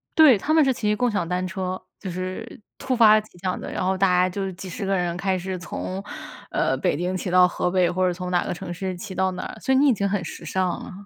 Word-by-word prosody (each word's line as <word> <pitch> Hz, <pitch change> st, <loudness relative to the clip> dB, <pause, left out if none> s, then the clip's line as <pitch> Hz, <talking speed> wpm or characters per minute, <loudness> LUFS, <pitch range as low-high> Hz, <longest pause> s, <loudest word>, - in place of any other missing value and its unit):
对， 300 Hz, -8 st, +8 dB
他 305 Hz, +10 st, -1 dB
们 320 Hz, -, +6 dB
是 265 Hz, -, +3 dB
骑 210 Hz, -3 st, 0 dB
共 245 Hz, +3 st, +1 dB
享 200 Hz, -5 st, -1 dB
单 180 Hz, +1 st, -1 dB
车。 185 Hz, 0 st, -4 dB, 0.2 s
就 195 Hz, -, -5 dB
是 185 Hz, +5 st, -5 dB, 0.2 s
突 260 Hz, -1 st, -1 dB
发 215 Hz, -2 st, +7 dB
奇 215 Hz, -4 st, -20 dB
想 185 Hz, -1 st, -1 dB
的， -, -, -6 dB
然 185 Hz, -, -2 dB
后 190 Hz, -, +2 dB
大 195 Hz, +1 st, +3 dB
家 180 Hz, 0 st, +4 dB
就 195 Hz, +1 st, -3 dB
几 185 Hz, +2 st, -9 dB
十 180 Hz, -, -6 dB
个 195 Hz, 0 st, +2 dB
人 175 Hz, -1 st, -1 dB
开 190 Hz, 0 st, 0 dB
始 185 Hz, +1 st, -4 dB
从， 185 Hz, +2 st, -5 dB, 0.5 s
呃， 130 Hz, -, +1 dB
北 140 Hz, -, 0 dB
京 180 Hz, +3 st, -1 dB
骑 185 Hz, 0 st, -3 dB
到 180 Hz, 0 st, +6 dB
河 180 Hz, -, -1 dB
北， 180 Hz, -1 st, +2 dB
或 185 Hz, +1 st, +1 dB
者 -, -, +2 dB
从 180 Hz, +1 st, -5 dB
哪 175 Hz, -1 st, +2 dB
个 -, -, -4 dB
城 175 Hz, -, -6 dB
市 185 Hz, +1 st, -4 dB
骑 190 Hz, +2 st, -7 dB
到 190 Hz, 0 st, +1 dB
哪 180 Hz, -, -5 dB
儿， -, -, -7 dB
所 -, -, -1 dB
以 -, -, +4 dB
你 285 Hz, +2 st, +5 dB
已 265 Hz, -, +5 dB
经 200 Hz, -2 st, -1 dB
很 195 Hz, -3 st, -1 dB
时 -, -, -8 dB
尚 185 Hz, +3 st, 0 dB, 0.2 s
了。 -, -, -9 dB
185 Hz, 300 characters per minute, -24 LUFS, 180-205 Hz, 0.5 s, 对